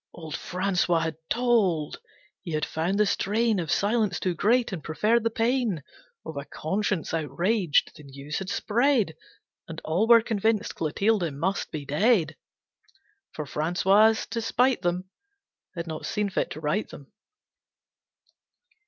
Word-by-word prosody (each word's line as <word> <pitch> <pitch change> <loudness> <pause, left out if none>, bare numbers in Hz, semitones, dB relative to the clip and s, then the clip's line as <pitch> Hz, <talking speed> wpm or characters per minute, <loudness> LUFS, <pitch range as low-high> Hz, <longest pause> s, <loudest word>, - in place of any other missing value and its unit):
Old 160 -3 -7
Francois 180 -2 0
had 160 -1 -3
told. 210 -11 +1 0.4
He 170 - -6
had 155 - 0
found 170 +5 -1
the 210 - +4
strain 215 +2 +1
Of 165 -3 -4
silence 210 0 +1
too 185 - -1
great, 230 +7 +2
and 175 -5 -5
preferred 215 +8 +1
the 230 - +2
pain 230 - 0 0.4
Of 160 - -7
a 140 - -4
conscience 190 +3 -2
outraged. 165 - +1
The - - -13
news 140 +2 -6
had 190 -1 -6
spread, 235 - +1 0.5
And 165 -1 -7
all 180 +8 +1
were 230 -1 +7
convinced 220 -1 0
Clotilde 180 +2 0
must 170 +8 -2
be 150 -2 -6
dead. 160 - +2 1.0
For 150 - -5
Francois, 190 +9 +3 0.2
to 230 - -2
spite 250 +3 +2
them, 175 +1 -1 0.7
Had 170 -1 -4
not 160 -2 -5
seen 210 -1 -1
fit - - -1
to - - -7
right 155 +7 -1
them. 140 - -13
190 Hz, 145 wpm, -26 LUFS, 160-220 Hz, 1.0 s, were